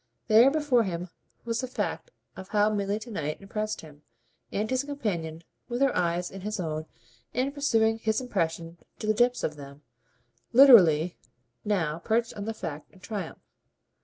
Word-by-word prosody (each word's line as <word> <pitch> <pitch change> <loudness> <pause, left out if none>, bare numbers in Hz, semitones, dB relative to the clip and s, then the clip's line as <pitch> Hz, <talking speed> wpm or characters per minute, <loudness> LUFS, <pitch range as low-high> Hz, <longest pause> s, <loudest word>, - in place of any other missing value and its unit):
There 230 +3 +7
before 290 -5 +2
him 180 -3 -3 0.4
was 230 0 -1
the 255 - -3
fact 250 - -3 0.3
of 190 - -9
how 210 0 +3
Milly 200 0 -1
to 225 +2 -9
night 155 -7 -3
impressed 215 +2 -4
him, 150 -2 -14 0.5
and 210 +2 -1
his 260 +3 0
companion, 175 - -4 0.3
with 240 0 -2
her 275 -1 +3
eyes 175 0 0
in 195 - -8
his 210 +1 -4
own 155 -2 -3 0.5
and 260 +3 0
pursuing 225 -6 +2
his 220 -1 0
impression 170 -8 -3 0.2
to - - -6
the 215 - +3
depths 245 +3 +2
of 150 - -2
them, 140 +1 -11 0.7
literally 180 - +7 0.4
now 170 -7 0
perched 230 +5 0
on 205 - -6
the 225 - -3
fact 150 -7 -6
in 190 - -20
triumph. 185 -2 -6
210 Hz, 165 wpm, -27 LUFS, 170-235 Hz, 0.7 s, There